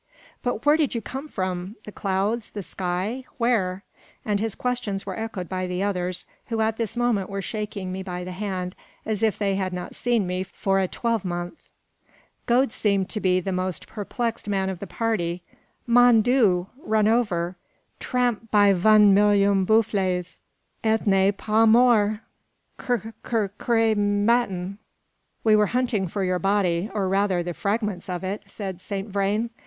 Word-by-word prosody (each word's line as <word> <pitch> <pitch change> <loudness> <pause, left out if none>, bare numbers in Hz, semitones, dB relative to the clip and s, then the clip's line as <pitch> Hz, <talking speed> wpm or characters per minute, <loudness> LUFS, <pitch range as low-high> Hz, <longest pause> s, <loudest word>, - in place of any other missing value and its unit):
"But 245 -1 -2
where 295 +1 +6
did 295 -6 0
you - - +1
come 270 +7 -6
from? 185 -3 -3
the 210 - -8
clouds? 200 +4 -1
the 205 - -6
sky? 190 +9 -3
where?" 200 -6 +1 0.4
And 205 -2 0
his 220 -1 -2
questions 245 -6 -2
were 190 -2 -4
echoed 220 -5 -5
by 185 0 -3
the 180 +1 -2
others, 180 -3 -2 0.2
who 230 -2 -2
at 220 0 +1
this 230 0 -3
moment 235 -6 +1
were 195 0 -3
shaking 210 -3 -4
me 190 +1 -4
by 180 -1 -5
the 180 - -6
hand, 185 -1 -4 0.3
as 215 -2 -2
if 220 -4 +2
they 200 -2 0
had 190 -1 -2
not 180 0 -5
seen 235 -4 0
me 180 +1 -2
for 195 +1 -1
a 190 - +1
twelvemonth. 180 -6 -3 0.8
Gode 250 +1 +3
seemed 200 -4 0
to 215 - -2
be 185 -2 +2
the 190 +2 -3
most 185 -2 -2
perplexed 230 +2 -4
man 190 -1 0
of 185 - -7
the 200 - -6
party. 180 -6 -2 0.4
"Mon 240 -2 +6
Dieu! 215 -8 +3 0.2
run 215 -1 +2
over; 190 -7 +1 0.4
tramp 245 -3 -1
by 205 -2 +5
von 210 +2 +6
million 200 -1 +4
buffles, 190 -5 +1 0.4
et 220 0 +1
ne 195 -1 +4
pas 215 +2 +2
mort! 220 -3 +4 0.6
'Cr 235 -4 -2 0.2
r 215 -4 +1 0.2
re 225 -2 +4
matin!" 205 -2 +1 0.6
"We 220 -1 +5
were 210 -1 +4
hunting 235 -7 0
for 195 +3 -3
your 180 -1 0
body, 195 -1 +1
or 200 -3 -1
rather, 195 -2 +1
the 175 0 -4
fragments 205 -1 -2
of 180 0 -3
it," 195 +2 -3
said 190 -4 -6
Saint 200 +1 -5
Vrain. 205 +4 0
205 Hz, 165 wpm, -24 LUFS, 185-225 Hz, 0.8 s, where